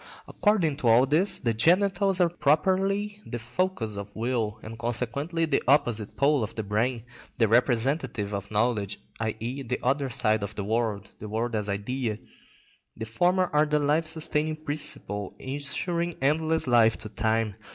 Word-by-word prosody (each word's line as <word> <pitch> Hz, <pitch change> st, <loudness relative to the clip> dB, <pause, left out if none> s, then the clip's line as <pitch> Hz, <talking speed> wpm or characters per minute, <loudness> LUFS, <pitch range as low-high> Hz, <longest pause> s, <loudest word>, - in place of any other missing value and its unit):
According 180 Hz, -9 st, +1 dB
to 130 Hz, -, -1 dB
all 115 Hz, +3 st, +6 dB
this, 160 Hz, +9 st, +3 dB
the 115 Hz, -2 st, 0 dB
genitals 190 Hz, -, +3 dB
are 175 Hz, -, +5 dB
properly 190 Hz, +7 st, +1 dB
the 120 Hz, -, -5 dB
focus 120 Hz, -, -2 dB
of 100 Hz, 0 st, -8 dB
will, 115 Hz, -2 st, -1 dB
and 115 Hz, +1 st, -9 dB
consequently 125 Hz, +8 st, -1 dB
the 155 Hz, -4 st, +1 dB
opposite 120 Hz, -7 st, +2 dB
pole 140 Hz, -1 st, +3 dB
of 110 Hz, -, -4 dB
the 110 Hz, -, -3 dB
brain, 115 Hz, +3 st, -1 dB, 0.3 s
the 115 Hz, -3 st, +3 dB
representative 120 Hz, -1 st, +1 dB
of 100 Hz, 0 st, -4 dB
knowledge, 105 Hz, -2 st, 0 dB, 0.2 s
i.e., 115 Hz, +4 st, -3 dB
the 125 Hz, -1 st, -2 dB
other 135 Hz, +2 st, +1 dB
side 110 Hz, -3 st, +1 dB
of 100 Hz, +1 st, -5 dB
the 100 Hz, -, -3 dB
world, 105 Hz, -2 st, -1 dB
the 105 Hz, -, -7 dB
world 115 Hz, +3 st, -2 dB
as 105 Hz, -1 st, -1 dB
idea. 110 Hz, +3 st, -2 dB, 0.8 s
The 110 Hz, -, -4 dB
former 180 Hz, +11 st, +2 dB
are 150 Hz, +1 st, +4 dB
the 150 Hz, 0 st, +2 dB
life 150 Hz, +2 st, +1 dB
sustaining 155 Hz, -1 st, -1 dB
principle 145 Hz, -10 st, -4 dB
ensuring 170 Hz, +5 st, -2 dB
endless 160 Hz, +4 st, +1 dB
life 115 Hz, -3 st, +4 dB
to 110 Hz, -, -8 dB
time. 110 Hz, 0 st, 0 dB
125 Hz, 160 wpm, -27 LUFS, 110-155 Hz, 0.8 s, all